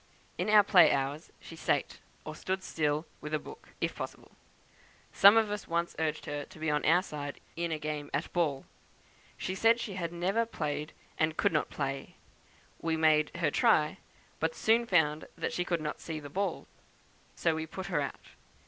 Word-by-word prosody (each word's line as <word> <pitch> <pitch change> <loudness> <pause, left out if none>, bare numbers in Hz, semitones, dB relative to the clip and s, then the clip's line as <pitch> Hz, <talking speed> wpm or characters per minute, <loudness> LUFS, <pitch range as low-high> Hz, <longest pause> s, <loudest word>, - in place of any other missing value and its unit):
In - - -2
our 210 -1 +8
play 180 -5 +7
hours 140 +3 -2
she - - -11
sate, - - -1 0.3
or - - -5
stood 190 0 -3
still, 150 -1 0 0.2
with 150 +1 -2
a - - +2
book, - - -12
if - - -1
possible. - - -7 0.8
Some 200 +3 +8
of 220 -2 +3
us 210 -1 -4
once 170 +1 -1
urged 155 -1 -1
her 145 0 -3
to 185 +4 -15
be 155 -1 -1
on 150 - 0
our 175 +3 +5
side 145 -5 -6 0.2
in 170 0 -2
a 160 - 0
game 150 -1 -4
at 145 +4 -3
ball. 150 -6 0 0.7
She 185 - -3
said 225 +4 +4
she 210 - -4
had 170 -3 -3
never 190 +7 0
played, 150 -6 -3 0.3
and 155 0 +1
could - - +2
not 150 - +1
play. 135 -1 -4 0.7
We 165 -1 0
made 155 -1 +4
her - - +1
try, - - +3 0.4
but 485 - 0
soon 230 +2 +3
found 155 -5 +2
that - - -2
she 180 - 0
could 170 -2 -1
not 150 0 -4
see 160 -2 -5
the 145 -2 -10
ball, 195 0 -2 0.7
so 165 - +1
we 160 0 -3
put 190 +4 -6
her 170 -7 0
out. 140 - -5
160 Hz, 190 wpm, -31 LUFS, 150-185 Hz, 0.8 s, our